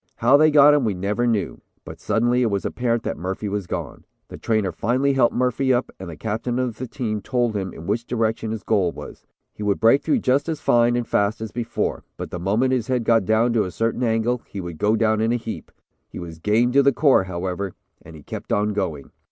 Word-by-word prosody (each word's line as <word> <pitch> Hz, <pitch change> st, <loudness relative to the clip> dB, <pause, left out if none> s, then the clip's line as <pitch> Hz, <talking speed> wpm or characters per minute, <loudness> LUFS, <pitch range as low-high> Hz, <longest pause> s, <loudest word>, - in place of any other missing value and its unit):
How 125 Hz, +4 st, +4 dB
they 155 Hz, +2 st, +6 dB
got 145 Hz, -1 st, +7 dB
him 145 Hz, -2 st, +2 dB
we 105 Hz, -4 st, 0 dB
never 105 Hz, +6 st, -1 dB
knew, 105 Hz, -7 st, -1 dB, 0.2 s
but -, -, -10 dB
suddenly 120 Hz, +2 st, +1 dB
it 120 Hz, -, +2 dB
was 100 Hz, -1 st, -2 dB
apparent 120 Hz, -2 st, -1 dB
that -, -, -4 dB
Murphy 95 Hz, +4 st, -4 dB
was 100 Hz, -2 st, -3 dB
gone. -, -, -5 dB, 0.3 s
The -, -, -9 dB
trainer 110 Hz, -4 st, 0 dB
finally 130 Hz, +4 st, 0 dB
helped 130 Hz, -3 st, +2 dB
Murphy 125 Hz, +2 st, +1 dB
up 125 Hz, 0 st, 0 dB
and 95 Hz, -2 st, -7 dB
the 80 Hz, -, -9 dB
captain 115 Hz, +3 st, -3 dB
of 125 Hz, -3 st, -2 dB
the 130 Hz, -, -4 dB
team 110 Hz, -1 st, -3 dB
told 120 Hz, -2 st, -1 dB
him 95 Hz, -2 st, -3 dB
in 80 Hz, -, -10 dB
which 115 Hz, +6 st, -1 dB
direction 115 Hz, -2 st, -1 dB
his 110 Hz, -1 st, -5 dB
goal 100 Hz, -6 st, +1 dB
was. -, -, -11 dB, 0.3 s
He -, -, -12 dB
would 105 Hz, -1 st, 0 dB
break 115 Hz, +5 st, +5 dB
through 290 Hz, -, +1 dB
just 140 Hz, +2 st, +1 dB
as 160 Hz, -2 st, -2 dB
fine 120 Hz, -2 st, +3 dB
and 120 Hz, -1 st, -2 dB
fast 100 Hz, +2 st, 0 dB
as 110 Hz, -1 st, -6 dB
before, 120 Hz, -1 st, -3 dB
but -, -, -6 dB
the 90 Hz, -, -5 dB
moment 110 Hz, +9 st, +1 dB
his 125 Hz, -3 st, -1 dB
head 125 Hz, -2 st, 0 dB
got 115 Hz, -3 st, +3 dB
down 110 Hz, +3 st, +2 dB
to 110 Hz, -3 st, +2 dB
a -, -, -4 dB
certain 115 Hz, +6 st, -2 dB
angle, 115 Hz, +1 st, 0 dB
he 100 Hz, -, -7 dB
would 85 Hz, -4 st, -7 dB
go 105 Hz, +2 st, +2 dB
down 110 Hz, -1 st, +1 dB
in 110 Hz, +1 st, +1 dB
a -, -, +2 dB
heap. 115 Hz, -2 st, -6 dB, 0.4 s
He -, -, -10 dB
was 85 Hz, -2 st, -8 dB
game 110 Hz, +7 st, +2 dB
to 140 Hz, +2 st, +5 dB
the 140 Hz, -, +4 dB
core, 135 Hz, -7 st, +4 dB
however, 95 Hz, +1 st, -4 dB, 0.3 s
and 80 Hz, 0 st, -13 dB
he 75 Hz, -, -13 dB
kept -, -, -8 dB
on 105 Hz, +1 st, +1 dB
going. 85 Hz, -8 st, -3 dB
115 Hz, 240 wpm, -22 LUFS, 100-125 Hz, 0.4 s, got